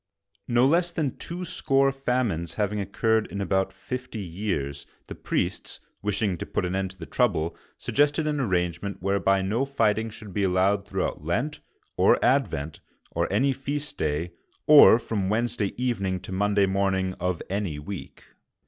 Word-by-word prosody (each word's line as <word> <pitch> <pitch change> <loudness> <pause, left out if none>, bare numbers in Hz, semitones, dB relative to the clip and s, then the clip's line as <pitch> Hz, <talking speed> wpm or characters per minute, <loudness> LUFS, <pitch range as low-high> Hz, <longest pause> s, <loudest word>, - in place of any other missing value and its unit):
No 120 +1 +4
less 170 +5 +3
than 155 -5 -1
twoscore 135 -6 0
famines 125 - -1
having 105 0 -1
occurred 110 +3 +1
in 100 - -6
about 95 -1 0
fifty 125 +5 -6
years, 80 -8 -3 0.2
the - - -7
priests, - - -3 0.2
wishing 100 -3 -1
to - - -4
put - - -1
an 90 - -2
end 95 -1 -1
to 95 - -13
the 85 - -7
trouble, 80 +1 0 0.2
suggested 145 +2 +1
an 150 -1 0
arrangement 90 -3 -1
whereby 95 0 +2
no 110 +7 0
fighting 115 -5 +1
should 105 -2 -10
be 105 - -1
allowed 100 +2 +2
throughout 90 - -2
Lent 120 - -1 0.4
or - - +5
Advent, 75 +2 +1 0.3
or - - -1
any 135 +1 +2
feast 145 +3 -4
day, 80 +3 -1 0.3
or 150 -6 +9
from 105 -5 -2
Wednesday 110 -1 0
evening 100 -7 -1
to 95 - -9
Monday 100 +1 +2
morn 95 0 +1
ing 95 0 -1
of 90 -1 -1
any 95 -6 -2
week. 75 0 -8
100 Hz, 155 wpm, -26 LUFS, 95-125 Hz, 0.4 s, or